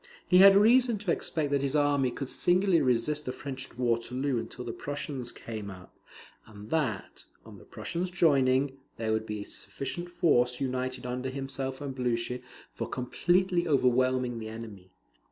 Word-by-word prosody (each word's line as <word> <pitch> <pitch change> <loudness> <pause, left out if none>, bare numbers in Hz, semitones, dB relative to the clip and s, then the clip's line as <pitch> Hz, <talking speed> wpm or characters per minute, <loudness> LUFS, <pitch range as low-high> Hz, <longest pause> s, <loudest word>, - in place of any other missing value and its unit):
He 180 - +6
had 195 0 +9
reason 235 +2 +5
to 200 -3 -2
expect 155 -3 0
that 140 -1 +2
his 140 +1 -1
army 145 -3 +3
could 135 +2 -5
singly 180 +3 +2
resist 135 +4 +1
the - - 0
French 135 0 -7
at - - -20
Waterloo 125 +2 0
until 125 +2 -7
the 115 - -4
Prussians 140 -3 -5
came 110 -3 -7
up; 90 -1 -12 0.5
and 105 0 -12
that, 130 -12 -2 0.2
on - - -12
the - - -16
Prussians 180 +2 -4
joining, 135 -5 +2 0.2
there 110 -1 -1
would 110 0 -2
be 105 -1 -4
a - - -7
sufficient 175 +6 -5
force 125 -9 +2
united 130 -1 -2
under 125 +1 -3
himself 135 0 -4
and 140 -2 -4
Blucher 125 -1 -1 0.3
for - - -5
completely 175 +7 +1
overwhelming 130 -3 +2
the 110 - -6
enemy. 110 -5 -9
130 Hz, 165 wpm, -29 LUFS, 120-150 Hz, 0.5 s, had